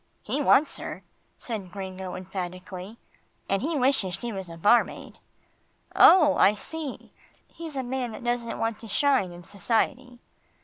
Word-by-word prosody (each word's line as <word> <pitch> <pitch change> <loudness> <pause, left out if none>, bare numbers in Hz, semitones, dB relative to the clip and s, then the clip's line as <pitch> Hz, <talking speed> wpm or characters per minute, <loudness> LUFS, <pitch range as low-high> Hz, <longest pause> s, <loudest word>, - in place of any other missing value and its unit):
"He 295 - -1
wants 290 +1 +4
her," - - -7 0.3
said 205 -7 -6
Gringo 190 -1 -6
emphatically, 185 +2 -7 0.5
"and 195 0 +1
he 310 +4 -1
wishes 255 -9 +1
she 240 -1 -5
was 190 -3 -6
a 165 - -9
barmaid." 210 +8 +2 0.8
"Oh! 310 -6 +8
I 205 - +5
see 305 +4 -7 0.3
he's 325 -3 -8
a 265 - -2
man 245 -2 -3
that - - -9
doesn't 240 -1 -2
want 225 -1 -2
to 225 - -10
shine 260 -4 +2
in 175 0 -11
society." 240 +6 -1
225 Hz, 145 wpm, -26 LUFS, 190-265 Hz, 0.8 s, Oh